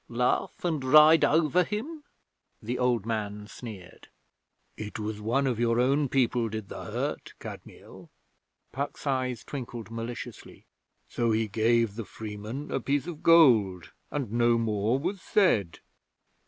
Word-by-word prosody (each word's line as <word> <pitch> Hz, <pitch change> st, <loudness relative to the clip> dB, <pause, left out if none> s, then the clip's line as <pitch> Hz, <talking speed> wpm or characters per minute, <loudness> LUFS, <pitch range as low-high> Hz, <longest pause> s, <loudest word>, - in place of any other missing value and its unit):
Laugh 125 Hz, +8 st, -1 dB
and 160 Hz, -6 st, -1 dB
ride 155 Hz, +4 st, +7 dB
over 160 Hz, +3 st, +3 dB
him?' 245 Hz, -, -5 dB, 0.6 s
the 120 Hz, +3 st, -4 dB
old 125 Hz, -4 st, +1 dB
man 105 Hz, -2 st, -3 dB
sneered. 105 Hz, -4 st, -11 dB, 0.7 s
'It 105 Hz, -1 st, -6 dB
was 105 Hz, -1 st, -4 dB
one 120 Hz, +6 st, +1 dB
of 125 Hz, -4 st, -1 dB
your 120 Hz, 0 st, +2 dB
own 140 Hz, +3 st, +2 dB
people 120 Hz, -3 st, +1 dB
did 110 Hz, -1 st, -6 dB
the -, -, -7 dB
hurt, -, -, -4 dB
Kadmiel.' -, -, -11 dB, 0.6 s
Puck's 140 Hz, +3 st, -5 dB
eyes 130 Hz, -4 st, -1 dB
twinkled 120 Hz, -5 st, -7 dB
maliciously. 115 Hz, 0 st, -7 dB, 0.4 s
'So 120 Hz, -1 st, -1 dB
he 110 Hz, 0 st, +1 dB
gave 115 Hz, +1 st, +2 dB
the 115 Hz, -, -4 dB
freeman 110 Hz, +7 st, -7 dB
a -, -, 0 dB
piece 140 Hz, +1 st, -1 dB
of 170 Hz, -3 st, -7 dB
gold, 110 Hz, -, +5 dB, 0.2 s
and 135 Hz, -8 st, -3 dB
no 120 Hz, 0 st, +3 dB
more 110 Hz, +1 st, 0 dB
was 180 Hz, +6 st, -3 dB
said.' 105 Hz, -, +1 dB
120 Hz, 140 wpm, -28 LUFS, 110-140 Hz, 0.7 s, ride